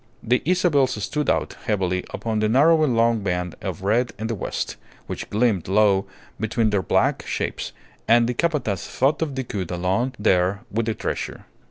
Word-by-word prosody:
The 125 Hz, +2 st, +2 dB
Isabels 165 Hz, -7 st, +3 dB
stood 150 Hz, +8 st, -1 dB
out -, -, 0 dB
heavily 95 Hz, -3 st, 0 dB
upon 110 Hz, -2 st, -2 dB
the 105 Hz, 0 st, +1 dB
narrowing 150 Hz, +1 st, +4 dB
long 115 Hz, 0 st, +3 dB
band 90 Hz, -3 st, -2 dB
of -, -, -5 dB
red 115 Hz, +5 st, +1 dB
in 110 Hz, -, -4 dB
the 115 Hz, -, -1 dB
west, 105 Hz, -, -3 dB, 0.3 s
which -, -, -6 dB
gleamed 105 Hz, -5 st, +1 dB
low 100 Hz, 0 st, +3 dB, 0.3 s
between 110 Hz, 0 st, +1 dB
their 100 Hz, -2 st, +2 dB
black -, -, +1 dB
shapes, -, -, -3 dB, 0.4 s
and 115 Hz, +1 st, +5 dB
the 125 Hz, -, 0 dB
Capataz 135 Hz, -, -1 dB
thought 135 Hz, +5 st, +1 dB
of 150 Hz, -4 st, -1 dB
Decoud 105 Hz, -9 st, -4 dB
alone 95 Hz, +9 st, 0 dB
there 95 Hz, 0 st, +2 dB
with 115 Hz, +2 st, -1 dB
the 110 Hz, -, 0 dB
treasure. -, -, -4 dB
110 Hz, 170 wpm, -23 LUFS, 100-130 Hz, 0.4 s, and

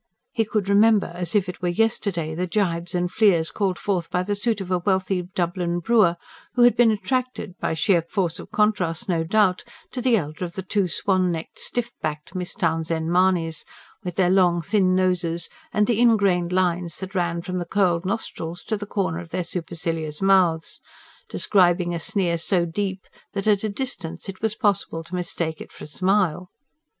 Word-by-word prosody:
He 225 Hz, -, 0 dB
could 210 Hz, -2 st, -1 dB
remember, 205 Hz, -1 st, +4 dB
as 175 Hz, +1 st, -3 dB
if 200 Hz, -3 st, +3 dB
it 180 Hz, -, -7 dB
were 180 Hz, -, 0 dB
yesterday, 175 Hz, -5 st, 0 dB
the 180 Hz, +3 st, -2 dB
jibes 175 Hz, -2 st, -1 dB
and 175 Hz, 0 st, 0 dB
fleers 180 Hz, -7 st, +3 dB
called 195 Hz, -3 st, -1 dB
forth 180 Hz, -5 st, -2 dB
by 180 Hz, -, 0 dB
the 205 Hz, +2 st, -1 dB
suit 215 Hz, +1 st, 0 dB
of 190 Hz, -1 st, -6 dB
a 180 Hz, -, +2 dB
wealthy 190 Hz, 0 st, 0 dB
Dublin 175 Hz, -1 st, -1 dB
brewer, 190 Hz, -2 st, +3 dB, 0.4 s
who 245 Hz, -, +5 dB
had 245 Hz, -, +6 dB
been 240 Hz, -2 st, +5 dB
attracted 245 Hz, -1 st, -2 dB
by -, -, -1 dB
sheer 170 Hz, +2 st, +3 dB
force 170 Hz, 0 st, -2 dB
of -, -, -10 dB
contrast, 190 Hz, -7 st, 0 dB
no 170 Hz, -3 st, +1 dB
doubt 185 Hz, +1 st, +2 dB, 0.3 s
to 250 Hz, -, -4 dB
the 245 Hz, -2 st, +4 dB
elder 155 Hz, -1 st, -4 dB
of 170 Hz, -1 st, -5 dB
the 190 Hz, -, -4 dB
two 195 Hz, +1 st, 0 dB
swan 185 Hz, +1 st, +1 dB
necked, 165 Hz, -1 st, -6 dB
stiff 240 Hz, -1 st, -3 dB
backed 150 Hz, +2 st, -4 dB
Miss 180 Hz, -2 st, -5 dB
Townshend 165 Hz, -1 st, -1 dB
Mahonys, 175 Hz, -4 st, +2 dB, 0.4 s
with 180 Hz, -2 st, -5 dB
their 180 Hz, -2 st, +3 dB
long, 180 Hz, -2 st, +4 dB
thin 185 Hz, +1 st, +2 dB
noses, 180 Hz, -2 st, 0 dB, 0.2 s
and 210 Hz, -, +2 dB
the 230 Hz, 0 st, +1 dB
ingrained 200 Hz, -7 st, +3 dB
lines 180 Hz, -2 st, 0 dB
that 190 Hz, +1 st, -7 dB
ran 170 Hz, -2 st, -1 dB
from 180 Hz, 0 st, -3 dB
the 175 Hz, -, -3 dB
curled 175 Hz, -2 st, +1 dB
nostrils 180 Hz, -4 st, -4 dB
to 215 Hz, -, -2 dB
the 205 Hz, 0 st, -7 dB
corners 175 Hz, -4 st, -2 dB
of -, -, -20 dB
their 180 Hz, -, -2 dB
supercilious 165 Hz, -3 st, -3 dB
mouths, 185 Hz, -4 st, +2 dB, 0.5 s
describing 175 Hz, -3 st, +2 dB
a 170 Hz, -, -2 dB
sneer 170 Hz, -1 st, 0 dB
so 175 Hz, 0 st, +2 dB
deep 190 Hz, +2 st, -3 dB, 0.3 s
that 195 Hz, -1 st, -3 dB
at 210 Hz, -1 st, +3 dB
a 215 Hz, -, 0 dB
distance 200 Hz, -8 st, -5 dB
it 190 Hz, -1 st, -7 dB
was 220 Hz, -1 st, 0 dB
possible 200 Hz, -8 st, 0 dB
to 170 Hz, -, -15 dB
mistake 170 Hz, -3 st, -3 dB
it -, -, -10 dB
for -, -, -12 dB
a -, -, -7 dB
smile. 185 Hz, +1 st, 0 dB
180 Hz, 190 wpm, -23 LUFS, 170-200 Hz, 0.5 s, had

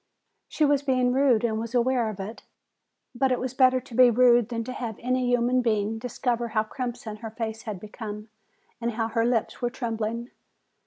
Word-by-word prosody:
She 310 Hz, -, +1 dB
was 285 Hz, -1 st, +3 dB
being 255 Hz, -3 st, +2 dB
rude 260 Hz, -4 st, +3 dB
and 220 Hz, -2 st, 0 dB
was 230 Hz, +2 st, -5 dB
aware 245 Hz, -1 st, +2 dB
of 210 Hz, -2 st, -7 dB
it. 205 Hz, +4 st, -6 dB, 0.7 s
But 260 Hz, +1 st, +1 dB
it 250 Hz, -, +1 dB
was 255 Hz, 0 st, -3 dB
better 255 Hz, -1 st, +4 dB
to 255 Hz, -1 st, -15 dB
be 250 Hz, +1 st, +7 dB
rude 240 Hz, -1 st, +4 dB
than 230 Hz, -1 st, -2 dB
to 255 Hz, -, -6 dB
have 235 Hz, -4 st, -4 dB
any 255 Hz, 0 st, 0 dB
human 245 Hz, +1 st, +2 dB
being 220 Hz, -1 st, 0 dB
discover 240 Hz, 0 st, -2 dB
how 215 Hz, -1 st, 0 dB
crimson 235 Hz, -2 st, -5 dB
her 225 Hz, +1 st, -7 dB
face 220 Hz, 0 st, -5 dB
had 200 Hz, -4 st, -5 dB
become 210 Hz, +1 st, -8 dB, 0.5 s
and 235 Hz, 0 st, -1 dB
how 225 Hz, 0 st, -1 dB
her 230 Hz, 0 st, +1 dB
lips 240 Hz, 0 st, -1 dB
were 240 Hz, -, +1 dB
trembling. 230 Hz, -1 st, -3 dB
235 Hz, 195 wpm, -26 LUFS, 220-255 Hz, 0.7 s, be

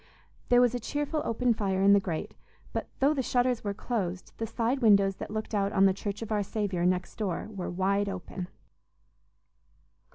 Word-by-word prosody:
There 245 Hz, 0 st, +6 dB
was 245 Hz, -1 st, +4 dB
a 245 Hz, -, -1 dB
cheerful 295 Hz, +5 st, -2 dB
open 240 Hz, +1 st, +1 dB
fire 195 Hz, -3 st, 0 dB
in 200 Hz, 0 st, +7 dB
the 200 Hz, -, +6 dB
grate, 175 Hz, -5 st, -4 dB, 0.4 s
but -, -, -3 dB
though 280 Hz, +3 st, +3 dB
the 275 Hz, -, 0 dB
shutters 245 Hz, -1 st, +1 dB
were 200 Hz, -1 st, -2 dB
closed, 190 Hz, -6 st, -3 dB
the 225 Hz, -, -3 dB
side 235 Hz, +4 st, 0 dB
windows 200 Hz, -4 st, +4 dB
that -, -, -6 dB
looked 215 Hz, +1 st, -4 dB
out 200 Hz, -1 st, +1 dB
on 195 Hz, -1 st, +5 dB
the 190 Hz, -, +5 dB
Church 200 Hz, +2 st, -4 dB
of 225 Hz, -, -8 dB
our 210 Hz, -1 st, +2 dB
Saviour, 195 Hz, -3 st, -1 dB
next 180 Hz, 0 st, -1 dB
door, 205 Hz, -1 st, -2 dB
were 195 Hz, -4 st, -4 dB
wide 195 Hz, +3 st, +1 dB
open. 185 Hz, -1 st, -6 dB
205 Hz, 190 wpm, -29 LUFS, 195-235 Hz, 0.4 s, in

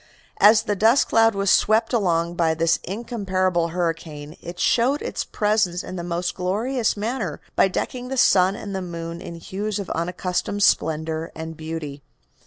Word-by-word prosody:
As 215 Hz, +1 st, +6 dB
the 210 Hz, -2 st, -1 dB
dust 225 Hz, +7 st, +4 dB
cloud 225 Hz, -1 st, +4 dB
was 195 Hz, 0 st, +2 dB
swept 225 Hz, +3 st, +3 dB
along 170 Hz, -6 st, +1 dB
by 165 Hz, -2 st, +1 dB
this 165 Hz, +1 st, +2 dB
incomparable 185 Hz, -5 st, -1 dB
hurricane 165 Hz, -3 st, -4 dB
it 175 Hz, +1 st, -8 dB
showed 260 Hz, +5 st, +2 dB
its -, -, -3 dB
presence 210 Hz, -5 st, 0 dB
in -, -, -7 dB
the 175 Hz, -, -4 dB
most 175 Hz, +1 st, -2 dB
glorious 220 Hz, +7 st, -1 dB
manner 210 Hz, -, -3 dB, 0.2 s
by -, -, +5 dB
decking 245 Hz, +6 st, -4 dB
the 265 Hz, +1 st, -4 dB
sun 190 Hz, -4 st, +4 dB
and 200 Hz, -2 st, -6 dB
the 190 Hz, -, -2 dB
moon 170 Hz, -1 st, -6 dB
in 170 Hz, -, -7 dB
hues 200 Hz, +5 st, -4 dB
of 200 Hz, -3 st, -5 dB
unaccustomed 180 Hz, +4 st, -2 dB
splendor 160 Hz, 0 st, +1 dB
and 160 Hz, 0 st, -6 dB
beauty. 155 Hz, -3 st, -6 dB
185 Hz, 165 wpm, -23 LUFS, 165-215 Hz, 0.2 s, As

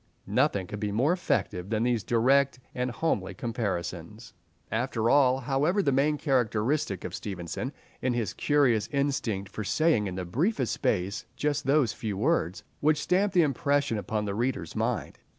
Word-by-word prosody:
Nothing 95 Hz, -2 st, +1 dB
could 105 Hz, +3 st, -6 dB
be 105 Hz, -1 st, -2 dB
more 130 Hz, +11 st, +2 dB
effective 100 Hz, -, -1 dB
than 110 Hz, 0 st, 0 dB
these 120 Hz, -4 st, +1 dB
direct 130 Hz, +4 st, +3 dB, 0.2 s
and 125 Hz, 0 st, -1 dB
homely 160 Hz, +7 st, -1 dB
comparisons. 105 Hz, -, -4 dB, 0.4 s
After 115 Hz, -1 st, 0 dB
all, 130 Hz, -2 st, +4 dB
however, 145 Hz, +10 st, +1 dB
the 140 Hz, -, +2 dB
main 145 Hz, +3 st, +2 dB
characteristic 120 Hz, -, 0 dB
of -, -, -5 dB
Stevenson 95 Hz, -, -4 dB, 0.3 s
is 125 Hz, -1 st, 0 dB
his 115 Hz, -3 st, -1 dB
curious 135 Hz, -8 st, +2 dB
instinct 125 Hz, -9 st, -1 dB
for 110 Hz, -, -4 dB
saying 105 Hz, -, +2 dB
in 90 Hz, -, -5 dB
the 90 Hz, -1 st, -4 dB
briefest 135 Hz, -, 0 dB
space 95 Hz, 0 st, -1 dB
just 145 Hz, -3 st, -1 dB
those 135 Hz, -6 st, +3 dB
few 105 Hz, -3 st, -4 dB
words 110 Hz, -, 0 dB, 0.2 s
which 150 Hz, 0 st, +3 dB
stamp 195 Hz, +5 st, +1 dB
the 175 Hz, -3 st, +5 dB
impression 140 Hz, -4 st, +1 dB
upon 105 Hz, +2 st, -2 dB
the 100 Hz, -, -2 dB
reader's 115 Hz, -6 st, -2 dB
mind. -, -, -2 dB
120 Hz, 160 wpm, -28 LUFS, 105-145 Hz, 0.4 s, the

